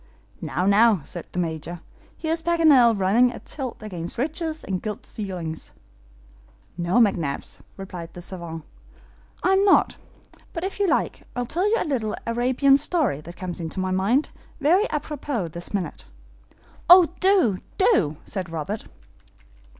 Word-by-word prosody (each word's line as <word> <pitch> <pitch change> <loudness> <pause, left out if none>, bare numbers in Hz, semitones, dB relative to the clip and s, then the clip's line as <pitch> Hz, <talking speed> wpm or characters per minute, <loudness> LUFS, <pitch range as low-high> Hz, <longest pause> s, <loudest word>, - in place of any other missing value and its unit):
"Now, 180 - -2
now," 205 -1 +5
said 170 +3 -7
the - - -8
Major, 165 0 -3 0.4
"here 320 0 -1
is 330 - -2
Paganel 300 -10 +5
running 225 +7 +4
a - - -8
tilt 260 -6 -6
against 175 -5 -5
riches 315 +4 -2
and 185 -2 -3
gilt 210 -2 -5
ceilings." 180 -6 -6 1.0
"No, 175 +2 -2
McNabbs," 175 -11 +1 0.2
replied 180 -4 -7
the 175 - -7
SAVANT, 170 -3 -7 0.8
"I'm 385 +1 +4
not; 400 - +4 0.6
but 335 - -4
if 390 +1 -4
you 400 - +2
like, - - 0
I'll 245 0 -1
tell 355 - +1
you 455 - +3
a - - -1
little 230 -8 -1
Arabian 255 +4 +3
story 295 - 0
that 170 +3 -11
comes 180 -2 -5
into 165 +2 -5
my 185 0 -1
mind, 205 +10 +1 0.3
very 345 +9 +4
APROPOS 290 - -3
this 170 +2 -8
minute." 185 -7 -4 0.8
"Oh, 355 -1 +9
do, 370 - +3 0.2
do," 175 - +3
said 185 -4 -4
Robert. 165 +7 -4
215 Hz, 145 wpm, -24 LUFS, -, 1.0 s, Oh